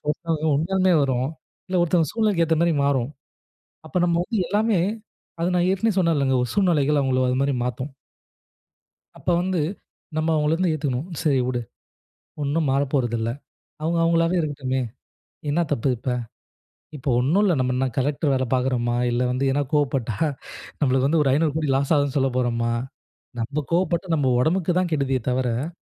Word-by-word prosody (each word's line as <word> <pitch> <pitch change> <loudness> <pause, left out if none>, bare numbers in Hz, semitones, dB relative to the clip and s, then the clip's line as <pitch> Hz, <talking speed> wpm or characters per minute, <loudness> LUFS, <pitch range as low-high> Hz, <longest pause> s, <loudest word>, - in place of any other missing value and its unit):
ஒருத்தவங்க 160 +1 -1
உண்மயாலுமே 185 +3 +2
வரும். 130 -2 0 0.4
இல்ல 185 -1 +1
ஒருத்தவங்க 165 -3 +2
சூழ்நிலைக்கு 210 -6 +2
ஏத்த 160 0 +1
மாரி 170 - +3
மாறும். 135 -2 +1 0.8
அப்ப - - -8
நம்ம 170 -1 +2
வந்து 215 -2 -1
எல்லாமே 210 -1 +2 0.6
அத 170 - +1
நான் 175 +1 +2
ஏற்கனவே 195 +1 +1
சொன்னேன்லங்க 145 -7 +2
ஒரு 125 - -3
சூழ்நிலைகள் 150 -7 +3
அவங்கள 130 -1 +1
அது 125 - +1
மாரி 140 -1 +1
மாத்தும். 130 +3 -4 1.2
அப்ப - - -12
வந்து 185 -3 0 0.6
நம்ம 155 +1 0
அவங்கள 150 +1 +2
வந்து 180 -1 +1
ஏத்துக்கணும். 140 0 -2
சரி 140 -5 +2
விடு, 125 -1 -1 0.8
ஒன்னும் 145 +1 0
மாறப்போறதில்ல. 130 -5 0 0.5
அவங்க 165 +2 0
அவங்களாவே 165 +1 +2
இருக்கட்டுமே! 135 -4 -2 0.7
என்னா 170 +4 +2
தப்பு 140 -1 0
இப்ப. 130 - -6 0.9
இப்ப 135 - -14
ஒன்னும் 160 +11 +2
இல்ல, 185 -5 +3
நம்ம 125 0 +1
என்ன 135 - +1
கலெக்டர் 140 +1 +1
வேல 130 - +1
பார்க்குறோமா? 125 -2 0
இல்ல 120 +1 0
வந்து 130 +2 -1
ஏதனா 145 +2 +1
கோவப்பட்டா 135 -7 0 0.6
நம்மளுக்கு 135 -2 +2
வந்து 160 +1 +2
ஒரு 135 - +2
500 150 +1 +2
கோடி 150 -3 0
லாஸ் 140 +3 +1
ஆகுதுன்னு 145 -2 +1
சொல்ல 135 0 +2
போறமா? 120 -2 0 0.7
நம்ம 140 +6 -2
கோவப்பட்டா 175 +1 +1
நம்ம 135 -4 +1
உடம்புக்கு 175 +4 +1
தான் 180 -2 -2
கெடுதியே 135 -4 0
தவிர 125 +4 -1
145 Hz, 155 wpm, -23 LUFS, 130-170 Hz, 1.2 s, மாரி